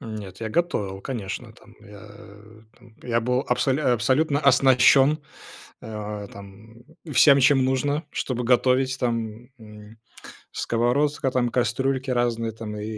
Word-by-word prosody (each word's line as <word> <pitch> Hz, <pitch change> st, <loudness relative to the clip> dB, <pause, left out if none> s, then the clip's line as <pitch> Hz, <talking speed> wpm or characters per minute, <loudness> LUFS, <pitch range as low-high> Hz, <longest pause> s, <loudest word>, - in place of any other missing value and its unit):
Нет, 105 Hz, -4 st, -9 dB
я 110 Hz, -, -3 dB
готовил, 105 Hz, -, -2 dB
конечно 105 Hz, -6 st, -6 dB
там. -, -, -20 dB
Я, 100 Hz, 0 st, -14 dB
э, 105 Hz, +2 st, -16 dB, 0.2 s
там 120 Hz, -2 st, -20 dB
я 115 Hz, -1 st, -1 dB
был 125 Hz, +2 st, 0 dB
абсоль 135 Hz, +1 st, +1 dB
абсолютно 140 Hz, +4 st, +1 dB
оснащён, 135 Hz, +2 st, +4 dB, 0.6 s
э, 105 Hz, -2 st, -7 dB
там 100 Hz, +2 st, -14 dB, 0.4 s
всем, 140 Hz, +1 st, +6 dB
чем 135 Hz, 0 st, +4 dB
нужно, 145 Hz, +4 st, -1 dB
чтобы 125 Hz, -2 st, -3 dB
готовить. 130 Hz, +1 st, +2 dB
Там, 115 Hz, -1 st, -3 dB
м, 105 Hz, 0 st, -14 dB, 0.5 s
сковородка, 135 Hz, +4 st, 0 dB
там 125 Hz, -1 st, 0 dB
кастрюльки 130 Hz, +3 st, -1 dB
разные, 115 Hz, -2 st, -1 dB
там 105 Hz, -1 st, -8 dB
и 105 Hz, -, -6 dB
120 Hz, 130 wpm, -23 LUFS, 110-130 Hz, 0.6 s, всем